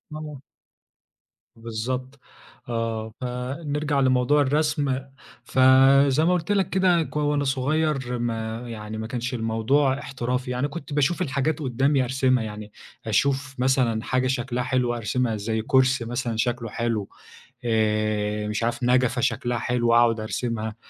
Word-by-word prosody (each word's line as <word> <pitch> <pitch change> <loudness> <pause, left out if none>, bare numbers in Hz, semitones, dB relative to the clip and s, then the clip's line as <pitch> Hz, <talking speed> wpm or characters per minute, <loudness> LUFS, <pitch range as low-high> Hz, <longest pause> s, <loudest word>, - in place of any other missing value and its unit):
آه. 150 -3 -7 1.1
بالضبط 125 +4 -5 0.5
آه، 115 -1 -3
فنرجع 140 +4 -2
لموضوع 130 +2 +3
الرسم، 145 -1 +1 0.4
ف 130 - -3 0.5
زي 145 +4 +2
ما 180 - +3
قُلت 180 +2 -1
لك 195 -3 +1
كده 180 -3 +3
ك - - -11
وأنا 145 -1 +1
صغير 135 -1 0
ما 115 -1 -3
يعني 110 -1 -6
ما 110 0 -4
كانش 125 +1 -4
الموضوع 125 +5 +1
احترافي، 125 -2 -3
يعني 125 +3 -1
كنت 145 -1 -8
باشوف 150 +5 +1
الحاجات 145 0 0
قدّامي 135 +1 +1
أرسمها 130 -1 +1
يعني، 105 -1 -7 0.3
أشوف 135 -1 0
مثلًا 125 -4 +1
حاجة 130 0 0
شكلها 125 -1 -1
حلو، 125 -1 0
أرسمها 120 0 -1
زي 110 +2 -2
كرسي 130 0 +2
مثلًا 120 -1 -3
شكلُه 120 0 -1
حلو 115 -2 -2 0.6
آآ، 105 -1 0
مش 105 +2 -2
عارف 120 +1 -1
نجفة 125 0 +2
شكلها 120 0 0
حلو، 120 0 0
وأقعد 115 -1 +4
أرسمها 110 0 -3
125 Hz, 135 wpm, -24 LUFS, 115-140 Hz, 1.1 s, وأقعد